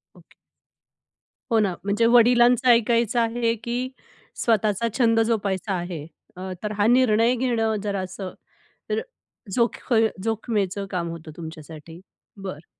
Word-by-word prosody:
Okay. - - -21 1.2
हो 225 - +4
ना, 200 -4 +1
म्हणजे 205 +3 +1
वडिलांचं 240 +1 +5
ऐकायचं 235 0 +3
आहे 230 0 +1
की 240 0 -2 0.7
स्वतःचा 220 -1 +1
छंद 230 -3 +3
जोपासायचा 200 -3 -1
आहे. 175 -4 -4 0.3
अ, 185 +1 -6
तर 210 - -2
हा 205 +1 +3
निर्णय 240 -1 +4
घेणं 230 -3 0
जरा 200 -2 -2
असं 185 0 -6 0.6
तर 435 +1 +1 0.5
जोख 240 +1 -1 0.3
जोखमीचं 205 -3 -2
काम 175 -3 -2
होतं 165 -1 -8
तुमच्यासाठी 160 0 -10 0.4
बरं. 185 -6 -8
215 Hz, 120 wpm, -24 LUFS, 185-235 Hz, 1.2 s, वडिलांचं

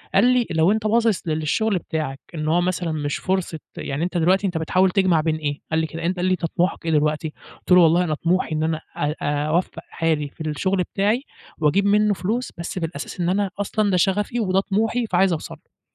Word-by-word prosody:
قال 200 - +6
لي: 250 -1 +3
"لو 165 +3 +3
أنت 215 0 0
باصص 225 -4 +1
للشغل 160 +7 0
بتاعك، 155 -6 -4 0.2
إن 155 -1 -3
هو 170 +3 +3
مثلًا 175 -2 -1
مش 145 -2 -2
فرصة 185 -4 -2 0.2
يعني 140 +4 -3
أنت 180 0 -2
دلوقتي 185 +4 +3
أنت 175 -3 -2
بتحاول 185 +4 +2
تجمع 180 -4 +3
بين 155 0 0
إيه؟" 150 -2 -3
قال 160 - +2
لي 160 - 0
كده، 165 +2 -6
أن 175 - +1
قال 180 -1 -2
لي: 185 - +2
"أنت 180 -2 0
طموحك 175 +1 -1
إيه 165 - 0
دلوقتي؟" 150 0 0 0.2
قُلت - - -10
له: 180 - +8
"والله 170 +2 +5
أنا 160 -3 -1
طموحي 170 0 0
إن 155 - 0
أنا 160 0 0 0.2
أ 150 +1 -1
أ 145 +1 0
أوفّق 170 +4 -1
حالي 155 -3 -1
في 150 - -14
الشغل 185 +5 0
بتاعي 210 +6 +1 0.4
وأجيب 160 +6 +2
منه 210 +1 +3
فلوس، 215 +7 -2
بس 170 +2 -4
في 165 - -1
الأساس 160 +1 -7
إن 175 - +1
أنا 195 +1 +1
أصلًا 205 +1 0
ده 185 - +2
شغفي 205 +6 +1
وده 190 -2 +2
طموحي، 225 +5 0
فعايز 185 -1 +3
أوصَل 155 - -5
له." - - -32
175 Hz, 225 wpm, -22 LUFS, 160-195 Hz, 0.4 s, له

